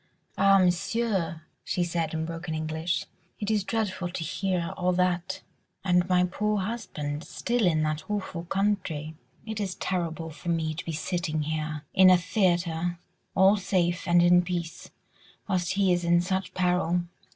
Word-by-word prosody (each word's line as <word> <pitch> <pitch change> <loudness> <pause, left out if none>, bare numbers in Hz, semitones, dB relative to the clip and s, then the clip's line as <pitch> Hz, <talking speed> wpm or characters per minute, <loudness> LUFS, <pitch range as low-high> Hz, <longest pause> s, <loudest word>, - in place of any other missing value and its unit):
"Ah, 195 0 +5
Monsieur!" 180 -2 0 0.2
she 180 - 0
said 165 -2 -1
in 160 0 -1
broken 165 0 -5
English, 160 +2 -2 0.3
"it 210 0 -1
is 210 -2 +2
dreadful 195 -4 -2
to 175 -1 -4
hear 185 +1 -1
all 180 -1 +1
that—and 180 0 -1
my 180 -1 +4
poor 210 +4 0
husband 160 -8 -4
still 215 +8 0
in 155 -2 +2
that 155 +2 -2
awful 190 -4 -3
country. 185 -6 -1 0.3
It 220 -1 -4
is 190 -3 -2
terrible 165 -3 -2
for 155 +3 -7
me 160 -2 0
to 155 - -6
be 165 - -3
sitting 160 -1 -2
here, 155 0 -3
in 190 0 +7
a 185 - +7
theatre, 175 -2 0 0.4
all 195 +2 +6
safe 180 -3 0
and 175 0 +5
in 175 0 +6
peace, 175 -2 -4 0.6
whilst 180 -4 0
he 195 -1 +3
is 175 0 0
in 170 0 +4
such 190 +1 -2
peril." 180 -1 +1
175 Hz, 155 wpm, -27 LUFS, 165-190 Hz, 0.6 s, in